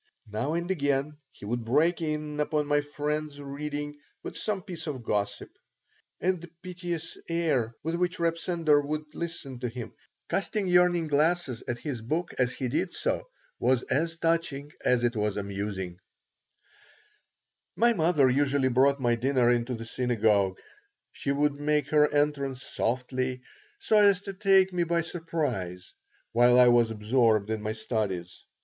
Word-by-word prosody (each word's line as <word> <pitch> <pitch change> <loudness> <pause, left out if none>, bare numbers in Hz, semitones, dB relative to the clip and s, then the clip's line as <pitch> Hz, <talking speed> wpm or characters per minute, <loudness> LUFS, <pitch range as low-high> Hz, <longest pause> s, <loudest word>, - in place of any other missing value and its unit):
Now 110 +8 -2
and 170 +2 -1
again 145 -3 0
he - - -12
would 120 +2 -2
break 155 +10 +2
in 150 -1 -3
upon 150 0 +1
my 145 0 +2
friend's 145 0 -3
reading 145 +1 -5 0.2
with - - -6
some 200 -4 -2
piece 180 -5 -7
of 135 -5 -4
gossip; 105 -2 -2 0.7
and 185 -1 0
the 170 - -9 0.2
piteous 175 -3 -5
air 145 -9 0
with 165 +2 -2
which 180 +1 0
Reb 165 -1 +1
Sender 165 -4 +2
would 150 +1 -4
listen 155 -7 -6
to 125 -1 -2
him, 120 -1 -7 0.3
casting 195 0 -1
yearning 180 -1 +4
glances 150 -3 +1
at 120 - -2
his 120 -1 -5
book 160 +10 -2
as 125 0 +2
he 130 - -3
did 165 +8 -1
so, - - -2 0.3
was 130 -1 +2
as 160 +5 +1
touching 165 -4 -1
as 125 -1 +2
it 120 0 +1
was 105 -1 -1
amusing 100 -3 -4 1.8
My 235 +1 +4
mother 160 -7 +3
usually 135 0 +2
brought 135 +3 +3
my 120 -2 +2
dinner 120 -1 +2
to 125 0 -3
the 115 0 -7
synagogue. 110 -6 +1 0.5
She 140 - -3
would 145 +1 +2
make 150 0 +1
her 150 -1 +4
entrance 140 -3 0
softly, 130 +1 -2 0.3
so 220 - +3
as 200 -3 +6
to 195 - -5
take 190 -1 +4
me 175 -1 +1
by 170 0 +1
surprise 140 - -3 0.4
while 120 +1 +5
I 125 -1 +8
was 120 -1 +4
absorbed 110 -1 +2
in 110 -1 -2
my 110 +1 -2
studies. 100 -6 -3
145 Hz, 155 wpm, -28 LUFS, 120-165 Hz, 1.8 s, I